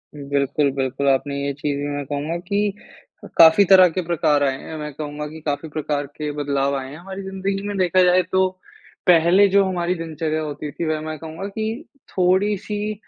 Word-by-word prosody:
बिल्कुल, 140 0 0
बिल्कुल। 135 +1 -2
आपने 135 +1 0
ये 140 - -1
चीज़ 140 0 -3
भी, 145 - -3
मैं 145 -1 -4
कहूँगा 150 +4 -3
कि 205 0 0 0.5
अ, - - -8
काफ़ी 165 +5 +8
तरह 185 -1 +7
के 185 +3 -2
प्रकार 150 -4 +2
आए 135 -1 0
हैं 160 - -8
मैं 150 -1 -6
कहूँगा 150 0 -5
कि 160 +1 -10
काफ़ी 145 +2 -2
प्रकार 145 -2 -2
के 150 -1 -3
बदलाव 140 -1 -1
आए 130 0 -6
हैं 145 - -9
हमारी 190 +2 -8
ज़िंदगी 195 +1 -3
में। 205 -1 -3
देखा 185 0 +3
जाए 180 +1 +5
तो 190 0 +3 0.7
पहले 180 +4 +6
जो 200 +1 +4
हमारी 180 -1 -1
दिनचर्या 155 -1 -3
होती 150 -1 -5
थी 170 - -4
वह 155 -1 -1
मैं 155 0 -5
कहूँगा 165 +4 -7
कि 220 - -4 0.2
थोड़ी-सी 205 +3 0
160 Hz, 195 wpm, -21 LUFS, 145-190 Hz, 0.7 s, काफ़ी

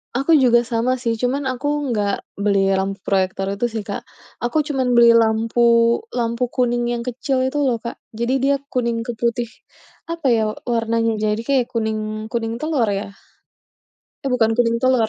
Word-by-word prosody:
Aku 275 +6 +3
juga 250 -5 +5
sama 230 +2 0
sih 230 -2 -1
cuman 255 +4 -1
aku 260 +2 -2 0.2
nggak 205 -5 -2
beli 200 -2 +3
lampu 195 +1 -2
proyektor 195 0 0
itu 210 - -1
sih 225 - -2
Kak. 200 - -4 0.4
Aku 240 +6 +1
cuman 265 -4 0
beli 235 -1 +6
lampu 225 +1 +2 0.5
lampu 235 0 -1
kuning 240 -1 +1
yang 240 - -2
kecil 265 +2 -1
itu 260 - -5
loh 250 -4 +1
Kak. 235 - -6 0.2
Jadi 235 +2 0
dia 280 +1 +3
kuning 235 -2 -2
ke 240 - -3
putih, 235 +1 -1 0.6
apa 335 -4 -2
ya, 225 - +1
eee, 215 - -14
warnanya, 230 0 +1
Jadi 215 +1 0
kayak 265 -3 +2
kuning 220 -2 -1 0.3
kuning 225 -1 -2
telur 305 -7 0
ya. 205 - -6 1.2
Eh - - 0
bukan 225 -2 +3
kuning 230 -1 +2
telur. 255 -4 +3
235 Hz, 170 wpm, -20 LUFS, 225-255 Hz, 1.2 s, beli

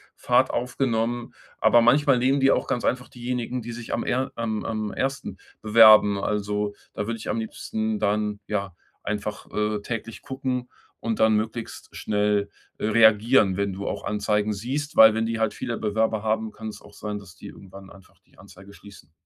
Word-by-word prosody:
Fahrt - - +2
aufgenommen. 120 -1 -1 0.3
Aber 120 - +5
manchmal 135 +2 +4
nehmen 130 +3 +2
die 135 0 +4
auch - - 0
ganz 125 -3 -1
einfach 125 -1 -1
diejenigen, 125 0 -4
die 115 +1 -7
sich 120 0 -8
am - - -2
eher 130 +2 -1
am 110 -2 -3
am 110 -2 -3
ersten 135 +1 -3 0.2
bewerben. 110 -2 +7
Also, 105 0 -1 0.2
da 105 - -4
würde 115 - -2
ich 110 - -9
am 115 - -1
liebsten 110 -1 -3
dann 105 0 0
ja 100 -3 -3 0.3
einfach, 105 0 -4
äh, 105 -1 -1
täglich 115 0 -6
gucken 130 -2 -4 0.3
und 115 -1 -2
dann 110 -1 +4
möglichst 110 +1 -4
schnell, 105 -1 0 0.3
äh, - - -3
reagieren, 110 -2 +4
wenn 100 -1 -1
du 100 +1 -6
auch - - -4
Anzeigen 105 0 0
siehst, 135 +9 -4
weil 110 0 +8
wenn 110 +1 0
die 115 0 -2
halt 110 -1 +1
viele 120 -1 -4
Bewerber 110 0 0
haben, 110 0 -1
kann 110 +1 -7
es - - -10
auch - - -16
sein, 105 -1 -5
dass 95 -4 -15
die - - -11
irgendwann 95 0 -12
einfach 95 -1 -18
die - - -28
Anzeige 100 +2 -15
schließen. 100 -8 -15
110 Hz, 185 wpm, -24 LUFS, 105-120 Hz, 0.3 s, weil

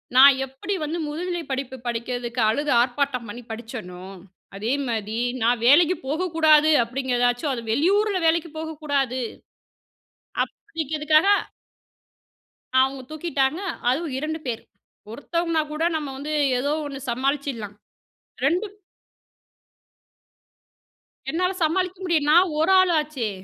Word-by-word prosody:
நான் 270 +1 +8
எப்டி 270 +10 -5
வந்து 315 +3 -2
முதுநிலை 345 +3 -3
படிப்பு 265 -1 -3
படிக்கறதுக்கு 240 0 -3
அழுது 290 +6 0
ஆர்ப்பாட்டம் 250 0 -1
பண்ணி 230 +4 -8
படிச்சனோ, 220 -6 -7 0.5
அதே 215 +5 -2 0.2
மாரி 220 -1 -3 0.3
நான் 235 0 +2
வேலைக்கு 340 +6 +6
போகக்கூடாது 315 -1 +3
அப்டிங்கிறதாச்சும் 245 +2 0
அது 235 - -4
வெளியூருல 390 - +2
வேலைக்கு 330 0 +2
போகக்கூடாது. 285 -5 -2 1.2
அப்டிங்கிறதுக்காக 310 +1 0 1.5
அவுங்க 265 0 0
தூக்கிட்டாங்க, 310 -1 -1 0.3
அதுவும் 290 +3 -1
2 310 +3 -3
பேர். 230 -2 -3 0.5
ஒருத்தவங்கனா 330 +5 -1
கூட, 315 +2 -2
நம்ம 295 -3 -3
வந்து 300 +2 -4 0.3
ஏதோ 285 +3 -1
1 275 -2 -6
சமாளிச்சிடலாம். 260 -4 -2 0.7
2 385 +7 0 2.5
என்னால 365 +3 0
சமாளிக்க 365 +3 0
முடிய 340 -3 +3
நான் 345 +2 +5
1 325 +4 +3
ஆள் 370 -2 +4
ஆச்சே. 285 -8 -3
285 Hz, 105 wpm, -24 LUFS, 245-325 Hz, 2.5 s, நான்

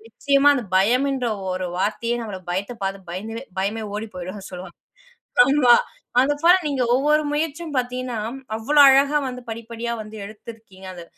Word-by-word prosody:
நிச்சயமா 280 +4 +3
அந்த 245 - -3
பயம்ன்ற 250 +5 +2 0.2
ஒரு 185 -1 -3
வார்த்தையே 230 +4 -1
நம்மள 200 -4 -6
பயத்த 200 +6 -3
பார்த்து 195 -2 -5
பயந்து 225 +7 -6 0.2
பயமே 215 +3 -2
ஓடி 215 +1 -4
போயிடும் 185 +2 -7
சொல்லுவாங்க. 180 -1 -9 0.7
ஆமா 270 -3 +5 0.5
அதுபோல 290 +6 +4
நீங்க 270 -3 0
ஒவ்வொரு 300 +3 +2
முயற்சியும் 310 0 -3
பார்த்தீங்கன்னா, 250 -2 -2 0.4
அவ்ளோ 290 +7 +1
அழகா 275 +2 +4
வந்து 250 0 -8
படிப்படியா 230 +1 -5
வந்து 215 +1 -12
எடுத்துருக்கீங்க. 215 -2 -12
அந்த 175 -1 -9
235 Hz, 140 wpm, -22 LUFS, 200-275 Hz, 0.7 s, ஆமா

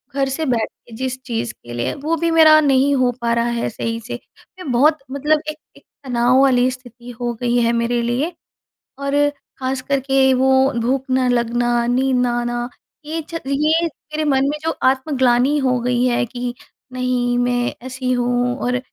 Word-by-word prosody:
घर 275 -1 +1
से 315 +4 -2
बैठ 240 -5 0 0.2
के 230 - -13
जिस 260 +2 -3
चीज़ 225 - -3
के 120 0 -12
लिए, 120 +2 -2
वो 310 +4 -2
भी 335 +2 0
मेरा 315 -1 +7
नहीं 275 0 +3
हो 255 -2 +2
पा 235 0 0
रहा 235 0 +1
है 235 0 -2
सही 230 +1 -4
से। 245 - -4 0.4
मैं 310 -8 -5
बहुत 295 +6 +4
मतलब 300 +3 +1
एक 305 - -5 0.2
एक - - -19 0.2
तनाव 245 +1 +3
वाली 255 -2 +4
स्थिति 245 -1 -12
हो 240 0 -1
गई 240 0 +1
है 230 - +2
मेरे 235 +1 0
लिए, 245 +8 -1 0.7
और 280 0 -2 0.5
खासकर 265 +1 -1
के 270 0 +3
वो 260 +1 +2 0.3
भूख 260 +3 0
ना 255 0 +2
लगना, 240 0 +1
नींद 255 +1 +1
ना 245 -1 +1
आना, 240 0 -3 0.4
ये 320 +2 -3
च 330 - -4
ये 305 +4 +2 0.3
मेरे 310 - 0
मन 270 0 +2
में 300 - -2
जो 325 - 0
आत्मग्लानी 260 0 +2
हो 255 -3 +1
गई 245 0 +1
है 240 -1 +1
कि 245 +1 -5 0.4
नहीं, 250 -1 0
मैं 245 0 0
ऐसी 255 0 -3
हूँ 245 0 0
और 250 0 0
255 Hz, 185 wpm, -19 LUFS, 240-275 Hz, 0.7 s, मेरा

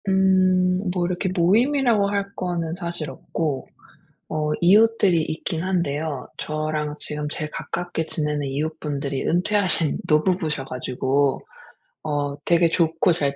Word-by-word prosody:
음 190 -1 +4 0.4
뭐 180 -2 0
이렇게 180 +2 -1
모임이라고 220 +4 +3
할 200 0 -2
거는 170 -3 -2
사실 170 -3 -4
없고 145 -6 -4 0.6
어 150 -1 -1
이웃들이 200 -2 +5
있긴 160 +1 -3
한데요. 155 -6 -2
저랑 155 -1 -3
지금 150 0 -4
제일 155 -1 -4
가깝게 175 -2 -3
지내는 150 -2 -1
이웃분들이 140 -1 -3
은퇴하신 180 -3 +3
노부부셔 155 -2 +1
가지고 130 +2 0 0.6
어 145 -2 -2
되게 170 -1 +4
좋고 165 +1 +2
잘 140 -4 -1
160 Hz, 275 characters per minute, -23 LUFS, 150-185 Hz, 0.6 s, 이웃들이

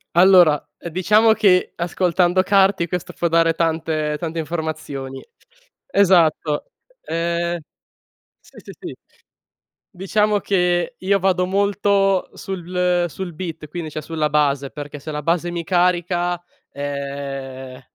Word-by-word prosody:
Allora, 175 -4 +6 0.2
ehm, 170 - -7
diciamo 215 +6 +4
che 195 -5 +3
ascoltando 175 +1 +1
Carti 195 -2 +3
questo 180 0 -4
può 170 - -1
dare 165 0 +3
tante 160 -2 -1
tante 165 -1 -4
informazioni. 155 -5 -5 0.6
Esatto, 170 - +2 0.3
ehm, 170 +1 -2 0.8
s - - -22
s - - -12
sì. - - -7 1.0
Diciamo 210 +3 +1
che 180 +2 0
io 195 +1 +1
vado 185 -1 +1
molto 200 0 +1
sul 180 -1 -1
sul 180 +2 -6
beat, 165 -2 -6
quindi 160 0 -6
cioè 155 +1 -5
sulla 155 -1 -2
base, 140 -2 +1
perché 145 -1 -8
se 155 - -7
la 150 -1 -4
base 170 +2 0
mi 170 -1 -4
carica, 175 0 +1 0.3
ehm, 140 -2 -6
175 Hz, 120 wpm, -21 LUFS, 155-185 Hz, 1.0 s, Allora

